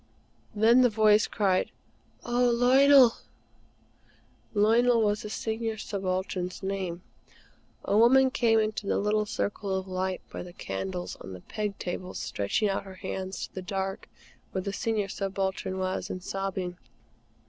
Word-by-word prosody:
Then 230 +4 +5
the 250 - +5
voice 215 -1 +4
cried: 190 -3 +1 0.6
"Oh, 245 +1 +2
Lionel!" 255 +1 +6 1.4
Lionel 230 +3 +4
was 210 0 +1
the 210 - -6
Senior 220 +1 -3
Subaltern's 185 -2 -3
name. 190 -3 -3 0.8
A 200 - +1
woman 260 +4 +6
came 235 -5 +3
into 215 -1 -2
the - - +1
little 210 +1 +1
circle 200 -1 -2
of 190 0 -3
light 185 0 -2
by - - -6
the 180 -1 -10
candles 95 - -5
on 95 - -9
the 90 - -9
peg 210 - -4
tables, 180 +1 -5
stretching 100 - -1
out 195 - -1
her 190 -1 -11
hands 190 0 -5
to - - -19
the 190 - -5
dark 195 0 -4 0.4
where 190 - -2
the 200 - -3
Senior 215 -2 -1
Subaltern 190 -1 -3
was, 185 0 -2
and 185 - -5
sobbing. 190 -2 -4
200 Hz, 145 wpm, -28 LUFS, 185-220 Hz, 1.4 s, Lionel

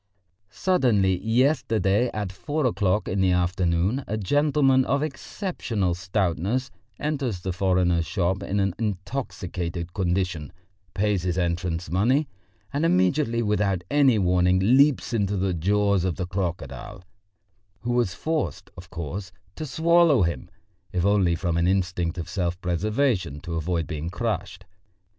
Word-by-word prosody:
Suddenly 105 - +2
yesterday 115 - +2
at 105 -3 -3
four 145 +9 -2
o'clock 105 -4 +1
in 95 +1 0
the 95 -1 +3
afternoon 90 +6 +1
a 110 - -2
gentleman 135 +4 +3
of 140 +3 0
exceptional 130 - -3
stoutness 95 +6 -1 0.3
enters 140 -10 -2
the 95 0 -3
foreigner's 90 -2 +1
shop 95 0 0
in 100 +1 -2
an 95 -2 +1
intoxicated 90 -5 -4
condition, 90 -5 -1 0.4
pays 100 -1 +1
his 90 0 -2
entrance 85 -2 -2
money, 125 - +2 0.5
and 145 +3 0
immediately 115 - +2
without 105 -4 0
any 140 -5 +4
warning 90 -1 +3
leaps 130 +7 +3
into 100 -3 0
the 95 0 0
jaws 100 +2 +2
of 90 -2 -1
the 90 - -3
crocodile, 90 0 -5 0.8
who 120 - -2
was 120 -7 +1
forced, 160 -1 -3
of 90 -1 -11
course, 85 +4 -5 0.2
to 155 - -5
swallow 160 - +4
him, 85 +1 -2 0.4
if 90 -1 0
only 100 -4 +3
from 85 -1 -1
an 85 +1 +2
instinct 90 -3 0
of 85 - -4
self 90 -2 -2
preservation, 90 - 0
to 85 - -7
avoid 80 0 -1
being 80 +1 -4
crushed. 95 -4 -3
95 Hz, 135 wpm, -25 LUFS, 90-120 Hz, 0.8 s, any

